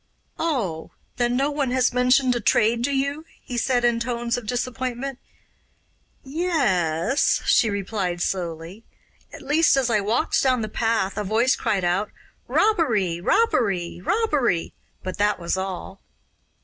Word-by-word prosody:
'Oh, 225 - -2 0.3
then 240 0 +1
no 280 +3 +1
one 285 -3 -1
has 255 -1 +1
mentioned 250 +1 +3
a - - 0
trade 230 +2 +2
to 280 - -1
you?' 280 +3 -1 0.2
he 245 - -8
said 245 0 +1
in 235 -1 +2
tones 235 0 -2
of 245 -3 -6
disappointment. 255 +2 -3 1.0
'Ye 315 +7 -3
es,' 190 - +1
she 225 - +4
replied 195 -3 -2
slowly. 175 +3 -4 0.5
'At - - -11
least, 300 0 +3
as 255 -3 +1
I 215 - +3
walked 215 +4 +1
down 255 -4 +2
the 215 - -4
path 220 -3 -1
a - - -1
voice 225 +6 +2
cried 195 -3 -1
out 180 +4 0 0.4
"Robbery! 225 - +1
Robbery! 195 - +1
Robbery!" 280 - 0 0.3
but 185 +1 -5
that 205 -1 +2
was 170 +1 -1
all. 190 0 -5
235 Hz, 145 wpm, -23 LUFS, 195-265 Hz, 1.0 s, she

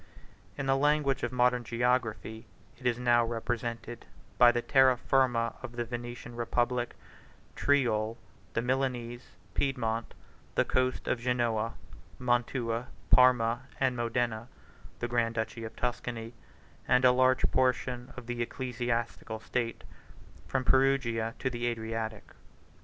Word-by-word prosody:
In 135 - -2
the 135 0 +3
language 145 -1 +2
of - - -1
modern 125 -1 +2
geography, 115 -2 -1 0.3
it 125 - -2
is 120 -1 +2
now 120 -1 +4
represented 115 0 -4 0.3
by 120 -1 +9
the 120 0 -1
Terra 130 -2 +5
Firma 120 -3 +2
of 130 -2 -7
the 120 0 -2
Venetian 120 0 -7
republic, 120 +1 0 0.6
Tyrol, 115 -6 +2 0.4
the 115 - 0
Milanese, 125 -2 -2 0.3
Piedmont, 115 -5 -1 0.4
the - - +3
coast 130 0 0
of 125 - +1
Genoa, 115 -2 0 0.4
Mantua, 120 -1 0 0.2
Parma, 120 -1 +5 0.2
and 130 -2 +2
Modena, 120 -1 -1 0.5
the 120 - -2
grand 115 -1 0
duchy 115 0 -3
of 110 - -7
Tuscany, 120 -1 -3 0.5
and 125 0 +4
a 125 - +8
large 130 +1 +3
portion 125 -1 0
of - - -8
the 120 0 -3
ecclesiastical 120 -2 -3
state 115 +1 -3 0.6
from 130 -1 -1
Perugia 130 -4 +2
to - - -2
the 120 0 -2
Adriatic. 110 -2 -3
120 Hz, 125 wpm, -30 LUFS, 115-125 Hz, 0.6 s, by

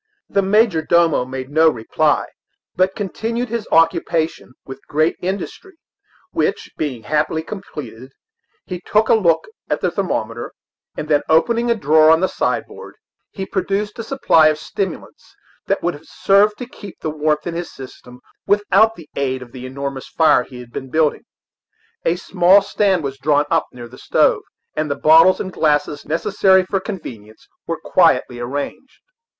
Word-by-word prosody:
The 200 - +1
major 200 -3 +3
domo 165 -5 +2
made 130 +1 -7
no 160 +2 +5
reply, 115 -7 0 0.5
but 185 +1 +1
continued 225 +4 -3
his 230 -1 -4
occupation 165 -3 +1
with 135 0 -9
great 155 +3 +1
industry, 195 - -5 0.6
which - - -2
being 130 -7 -4
happily 155 +4 -1
completed, 135 - -9 0.5
he 180 -2 -6
took 215 +3 +1
a - - +6
look 170 -7 +2 0.2
at 150 - 0
the 180 - 0
thermometer, 120 - -3 0.4
and 150 - -4
then 145 -1 +3
opening 235 +9 +2
a 235 - +3
drawer 155 -5 +4
of - - -3
the 190 - +3
sideboard, - - -4 0.3
he 195 - -6
produced 205 +3 -2
a - - -3
supply 225 - +3
of 155 -1 +1
stimulants 175 +4 -6 0.3
that - - 0
would 175 - 0
have 145 +2 -14
served 205 +2 +3
to 250 - -6
keep 205 -5 -12
the 155 - -2
warmth 150 0 -1
in 175 - -3
his 170 +1 -5
system 125 -1 -12 0.3
without 205 +2 +3
the 165 -3 -13
aid 130 -2 -2
of 120 - -16
the 130 0 -8
enormous 140 0 -6
fire 155 -5 +3
he 125 -1 -12
had 120 -1 -14
been 130 - -6
building. 155 +1 0 0.8
A 165 - +2
small 185 +2 +4
stand 195 -3 +1
was 135 -1 -5
drawn 145 +1 +2
up - - +2
near 120 -1 -10
the 125 +2 -15
stove, - - +2 0.3
and 155 0 -2
the 140 - -1
bottles 160 +5 +5
and 190 - -4
the - - -17
glasses 145 -1 +1
necessary 190 +4 +2
for 195 +1 -1
convenience 115 - -9 0.2
were - - -3
quietly 120 - +2
arranged. 140 - -6
160 Hz, 165 wpm, -19 LUFS, 140-195 Hz, 0.8 s, a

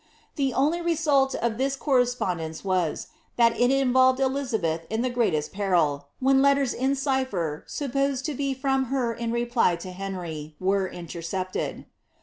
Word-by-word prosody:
The 275 -3 0
only 305 +6 +2
re 340 0 +1
mit 280 -4 +2
of 235 -1 -1
this 270 +1 +1
correspondence 245 - 0
was, 185 -4 -1 0.3
that 230 -1 +4
it 245 0 +3
involved 260 -1 +4
Elizabeth 225 - -1
in 220 +2 -1
the 255 - 0
greatest 195 -12 0
peril, 170 -8 +1
when 270 +1 +4
letters 280 -2 +3
in 265 +2 0
cipher, 260 - -1
supposed 275 -1 -1
to 305 - -2
be 275 0 -2
from 270 0 0
her 250 -2 -1
in 230 0 -3
reply 235 -5 +2
to 175 +2 -8
Henry, 175 -5 -6
were 190 +1 +1
intereepted. 175 +2 -5
240 Hz, 150 wpm, -26 LUFS, 185-270 Hz, 0.3 s, that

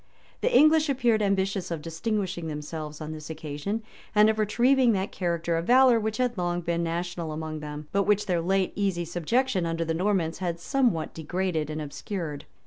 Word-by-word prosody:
The - - +1
English 310 -5 +5
appeared 240 -5 +2
ambitious 195 -2 0
of 165 -3 -4
distinguishing 180 0 -2
themselves 150 0 -6
on 155 0 -5
this 155 0 -8
occasion, 160 +7 -4 0.3
and 210 +1 +6
of 220 - -5
retrieving 245 +3 +3
that 195 0 -1
character 170 -2 -1
of 165 - -3
valor 250 -1 +6
which 220 0 -2
had 245 -5 0
long 175 0 -1
been 170 0 -1
national 170 -1 -3
among 155 0 -4
them, 150 0 -7
but 200 +1 +1
which 210 0 +2
their 180 -4 0
late 190 +2 +1
easy 190 -4 0
subjection 185 - 0
under 165 0 -1
the 165 - -1
Normans 180 -2 0
had 170 -2 -2
some 260 - +2
what 160 -3 -4
degraded 165 -1 -2
and 155 0 -4
obscured. 150 +1 -5
175 Hz, 185 wpm, -27 LUFS, 160-210 Hz, 0.3 s, and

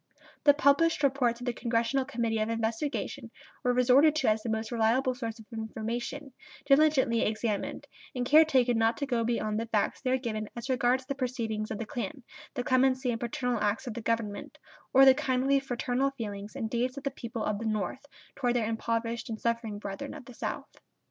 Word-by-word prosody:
The 290 -1 +7
published 290 +2 +3
reports 255 -4 +2
of - - -5
the 245 - 0
Congressional 235 +3 0
Committee 230 -4 -1
of 215 +1 0
Investigation 230 +2 -2 0.3
were 250 - +3
resorted 255 +5 +5
to 270 -6 +2
as 215 0 +1
the 230 - -4
most 220 +1 -2
reliable 240 +3 +2
source 230 -3 -5
of 220 - -13
information, 235 +5 -4 0.3
diligently 275 -5 +4
examined, 215 -1 -2 0.3
and 250 -1 -1
care 305 +5 +7
taken 250 -6 +2
not 225 +1 +2
to 285 - -2
go 240 -4 0
beyond 220 -2 -1
the 230 - -3
facts 215 -3 0
there 260 -1 +1
given 215 -4 -4
as 240 +3 -4
regards 255 0 +2
the 275 - -2
proceedings 230 -5 -3
of 220 - -3
the 225 - -4
Klan, 260 +5 -5 0.3
the 245 - -1
clemency 255 0 +2
and 230 - -3
paternal 240 0 -2
acts 210 +5 0
of 245 - -4
the 235 - -5
Government, 225 -3 -2 0.3
or 270 +1 +7
the 265 - +9
kindly, 265 +1 +1
fraternal 260 0 -1
feelings 210 -5 -7
and 225 - -2
deeds 245 +3 -1
of 280 - -6
the 275 - -1
people 230 -3 -5
of 210 -1 -1
the 225 - -5
North 215 +5 -2 0.3
toward 245 -2 0
their 235 -3 +1
impoverished 230 +1 -2
and 220 -1 -4
suffering 230 -3 -1
brethren 205 +9 -6
of 290 -5 -10
the 250 - -11
South. - - -5
240 Hz, 195 wpm, -29 LUFS, 225-265 Hz, 0.3 s, the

